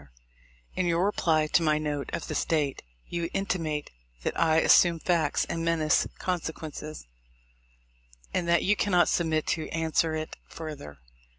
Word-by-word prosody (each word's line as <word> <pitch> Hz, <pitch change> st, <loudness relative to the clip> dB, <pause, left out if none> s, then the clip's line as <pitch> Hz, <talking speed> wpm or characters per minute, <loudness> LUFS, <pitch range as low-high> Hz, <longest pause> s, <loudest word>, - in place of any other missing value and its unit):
— -, -, -31 dB
In 185 Hz, -, 0 dB
your 170 Hz, +2 st, +2 dB
reply 160 Hz, -6 st, +2 dB
to 155 Hz, -, +2 dB
my 155 Hz, -2 st, +2 dB
note 150 Hz, -2 st, -3 dB
of -, -, -4 dB
this -, -, -1 dB
date, 150 Hz, -4 st, 0 dB, 0.2 s
you 170 Hz, -1 st, -3 dB
intimate 165 Hz, -6 st, -2 dB, 0.3 s
that -, -, -1 dB
I 160 Hz, -1 st, +3 dB
assume 170 Hz, +1 st, +5 dB
facts 160 Hz, -4 st, +1 dB
and 165 Hz, -, -3 dB
menace 165 Hz, -2 st, +2 dB
con 180 Hz, -2 st, -1 dB
sequences, 155 Hz, -, -7 dB, 1.3 s
and 175 Hz, -, 0 dB
that 170 Hz, -1 st, +3 dB
you 210 Hz, -, +3 dB
cannot 180 Hz, -4 st, +3 dB
submit 160 Hz, -2 st, +1 dB
to 160 Hz, -, -1 dB
answer 160 Hz, 0 st, 0 dB
it 155 Hz, 0 st, -5 dB
further. 150 Hz, -, -8 dB
160 Hz, 155 wpm, -28 LUFS, 155-170 Hz, 1.3 s, assume